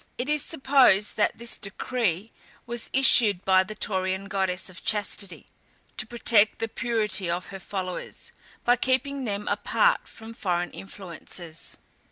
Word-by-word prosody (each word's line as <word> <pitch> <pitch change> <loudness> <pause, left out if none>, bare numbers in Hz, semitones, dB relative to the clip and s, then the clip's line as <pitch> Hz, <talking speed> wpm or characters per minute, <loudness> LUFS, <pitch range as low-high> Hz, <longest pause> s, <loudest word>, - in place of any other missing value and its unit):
It 250 - -3
is 300 -1 +1
supposed 265 -9 +3
that 210 - +1
this 235 0 -4
decree 210 -1 -2 0.3
was 240 -1 -5
issued 225 -7 +5
by 190 -1 +5
the 215 +3 -8
Taurian 190 -1 -1
goddess 190 -2 -1
of 185 -2 -11
Chastity, 205 -3 -2 0.5
to 215 - -2
protect 225 -2 +3
the 225 - -2
purity 215 -6 0
of 175 +1 -2
her 195 - -7
followers, 185 -2 -6 0.3
by 245 0 +5
keeping 265 +2 0
them 205 -2 -3
apart - - +2
from 225 0 -10
foreign 175 -5 -1
influences. 175 -3 -9
205 Hz, 140 wpm, -26 LUFS, 190-240 Hz, 0.5 s, issued